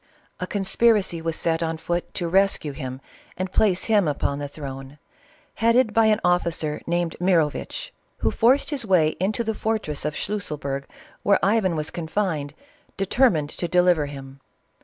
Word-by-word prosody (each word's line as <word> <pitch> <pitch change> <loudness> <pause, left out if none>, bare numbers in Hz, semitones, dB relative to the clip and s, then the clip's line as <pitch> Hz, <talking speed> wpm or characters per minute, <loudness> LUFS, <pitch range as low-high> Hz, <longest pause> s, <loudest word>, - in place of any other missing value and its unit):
A 180 - -3
conspiracy 200 -3 +2
was 165 -1 -2
set 165 -1 0
on 165 -1 -1
foot 175 +2 -3
to 175 - -1
rescue 190 -4 +2
him 130 -2 -6 0.4
and 185 0 -3
place 190 -4 +2
him 210 -6 +3
upon 140 -1 -1
the 145 - -4
throne, 135 -1 -8 0.6
headed 230 0 +4
by 225 0 +4
an 215 0 +3
officer 170 -4 0
named 170 -1 -1
Mirovitch, 175 - 0 0.2
who - - 0
forced 260 +6 +3
his 280 -4 -1
way 180 -7 +3
into 210 +6 0
the 220 0 -1
fortress 215 -10 -2
of 150 0 -2
Schlusselburg 145 -9 -3 0.4
where 200 - +4
Ivan 200 -4 +2
was 155 0 -2
con 170 -2 -5
fined, 160 -6 -2 0.4
determined 195 - +2
to 175 - -3
deliver 180 -4 +3
him. 135 -1 -10
175 Hz, 160 wpm, -24 LUFS, 150-205 Hz, 0.6 s, headed